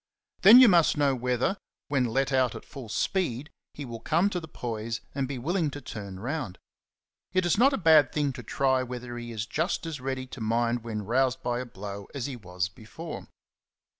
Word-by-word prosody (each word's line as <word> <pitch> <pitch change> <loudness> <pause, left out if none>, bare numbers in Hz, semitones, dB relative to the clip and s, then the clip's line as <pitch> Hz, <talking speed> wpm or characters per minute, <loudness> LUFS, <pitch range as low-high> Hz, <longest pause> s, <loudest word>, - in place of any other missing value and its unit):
'9 - - -33
Then - - +11
you 255 - +9
must 170 -6 +4
know 145 -2 +3
whether, 125 - 0 0.3
when 135 -3 +1
let 135 +4 0
out 130 -3 +2
at - - -9
full 130 -5 -9
speed, 150 - -1 0.2
he 145 - -6
will 115 -2 -7
come 170 - +1
to 180 - -1
the 160 - -9
poise 115 -4 -4
and 135 -1 -1
be 135 0 -4
willing 160 +5 0
to 145 - -7
turn 100 -7 -8
round. 125 - -4 0.8
It 185 -1 +2
is 175 - +3
not 260 +6 +5
a 275 - 0
bad 160 -5 +5
thing 145 -3 0
to 130 - -8
try 130 +2 +1
whether 125 -1 -6
he 120 0 -7
is 110 -1 -3
just 165 +8 -1
as 155 -5 -5
ready 130 0 -3
to 130 -1 -10
mind 115 +1 0
when 110 -2 -4
roused 130 +4 +1
by 120 0 -1
a 130 - -4
blow 100 -2 -8
as 130 -4 -3
he 140 - -4
was 90 -5 -3
before. 115 - -9
130 Hz, 210 wpm, -28 LUFS, 115-150 Hz, 0.8 s, Then